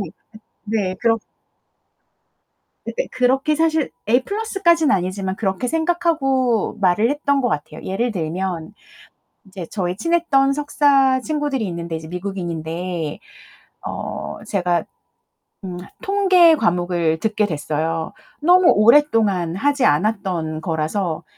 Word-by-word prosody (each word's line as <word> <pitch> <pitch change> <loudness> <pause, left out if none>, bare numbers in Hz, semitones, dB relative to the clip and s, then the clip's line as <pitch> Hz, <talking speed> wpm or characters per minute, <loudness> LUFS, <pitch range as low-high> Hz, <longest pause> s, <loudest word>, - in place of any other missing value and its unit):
네. 185 -5 -5 0.6
네. 205 -4 -1
그렇 230 -1 +2 1.7
근데 - - -3
그렇게 265 +4 +2
사실 320 -1 +1 0.2
A 245 +3 +3
플러스까지는 390 -8 +2
아니지만 190 +1 -2
그렇게 195 +2 -2
생각하고 310 - 0
말을 200 +5 +3
했던 280 -1 +1
것 245 - +1
같아요. 150 -4 -4
예를 235 +6 -1
들면 175 -1 -3 0.8
이제 190 -3 -7
저희 180 -3 -2
친했던 275 - +2
석사 275 -3 +3
친구들이 290 -5 -2
있는데 170 -1 -5
이제 160 0 -7
미국인인데 175 -3 -4 0.7
어 - - -5
제가 180 -3 0 0.8
음 180 -1 -6 0.2
통계 375 -4 +5
과목을 175 - 0
듣게 215 -1 +1
됐어요. 160 +1 -3 0.3
너무 355 +3 +5
오랫동안 215 - +3
하지 280 +4 +1
않았던 170 -2 0
거라서. 160 +1 -2
210 Hz, 260 characters per minute, -20 LUFS, 175-285 Hz, 1.7 s, 통계